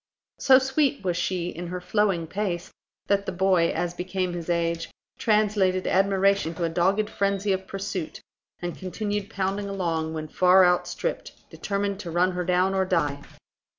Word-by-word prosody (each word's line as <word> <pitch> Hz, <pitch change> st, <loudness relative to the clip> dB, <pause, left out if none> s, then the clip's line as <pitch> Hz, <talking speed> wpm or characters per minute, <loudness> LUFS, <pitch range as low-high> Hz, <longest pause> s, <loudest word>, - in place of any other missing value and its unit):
So 260 Hz, -1 st, +7 dB
sweet 270 Hz, 0 st, +1 dB
was 180 Hz, -2 st, 0 dB
she 175 Hz, 0 st, -1 dB
in 175 Hz, +2 st, -6 dB
her 180 Hz, +1 st, -4 dB
flowing 190 Hz, -2 st, 0 dB
pace, 175 Hz, 0 st, -3 dB, 0.3 s
that 200 Hz, 0 st, +1 dB
the -, -, -1 dB
boy, 185 Hz, -2 st, +2 dB
as 170 Hz, +1 st, -2 dB
became 185 Hz, 0 st, -3 dB
his 175 Hz, -1 st, -6 dB
age, 170 Hz, -1 st, 0 dB, 0.3 s
translated 205 Hz, -4 st, +2 dB
admiration 195 Hz, -2 st, +2 dB
into 170 Hz, -, -4 dB
a 165 Hz, -, +1 dB
dogged 190 Hz, +6 st, +1 dB
frenzy 200 Hz, -1 st, 0 dB
of 190 Hz, 0 st, -4 dB
pursuit, 195 Hz, -4 st, -5 dB, 0.4 s
and 175 Hz, -1 st, -3 dB
continued 205 Hz, +2 st, -4 dB
pounding 200 Hz, 0 st, -2 dB
along, 165 Hz, -5 st, -2 dB
when 155 Hz, 0 st, -4 dB
far 185 Hz, +3 st, +5 dB
outstripped, 180 Hz, -, -2 dB
determined 200 Hz, -1 st, -2 dB
to 180 Hz, -, -6 dB
run 175 Hz, +2 st, +2 dB
her 180 Hz, 0 st, -2 dB
down 180 Hz, +2 st, +2 dB
or 190 Hz, 0 st, +2 dB
die. 145 Hz, -6 st, 0 dB
185 Hz, 160 wpm, -25 LUFS, 175-200 Hz, 0.4 s, So